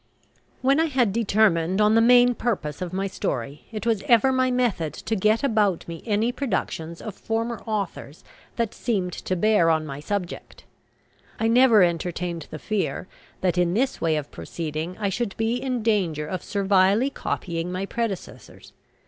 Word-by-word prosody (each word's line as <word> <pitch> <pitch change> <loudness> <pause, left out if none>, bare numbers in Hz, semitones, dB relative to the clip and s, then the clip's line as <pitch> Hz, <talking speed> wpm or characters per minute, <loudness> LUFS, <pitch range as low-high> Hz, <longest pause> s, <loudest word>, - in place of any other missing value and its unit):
When 275 +3 +4
I 325 - +4
had 255 -9 +1
determined 200 -5 +2
on 210 0 +4
the 225 - +5
main 245 +1 +6
purpose 190 -12 -3
of 180 -2 -3
my 190 +1 -2
story, 140 -7 -4
it 215 0 -5
was 225 -4 +1
ever 240 +2 +5
my 255 0 +2
method 240 -11 0
to 225 - -3
get 215 +4 +2
about 210 -9 +1
me 165 -1 -7
any 220 +3 +1
productions 180 - -3
of 215 - -5
former 230 +3 -3
authors 200 -8 -4 0.3
that 230 -3 -1
seemed 190 -7 -2
to 185 - -3
bear 205 -2 +3
on 160 -1 +2
my 140 -2 -6
subject. 180 +3 -5 0.8
I 225 - +1
never 230 -3 +6
entertained 170 -1 -2
the - - -6
fear 200 +1 -2 0.3
that 180 -1 +1
in 175 0 +2
this 260 +4 0
way 160 -2 +2
of 150 -2 -4
proceeding 160 +2 -5
I 205 -2 -1
should 205 +1 -3
be 225 +2 0
in 250 -2 -2
danger 180 -9 +1
of 185 +4 -4
servilely 200 +5 +2
copying 170 -8 -3
my 185 +2 -2
predecessors. 220 -3 -6
200 Hz, 165 wpm, -24 LUFS, 170-230 Hz, 0.8 s, main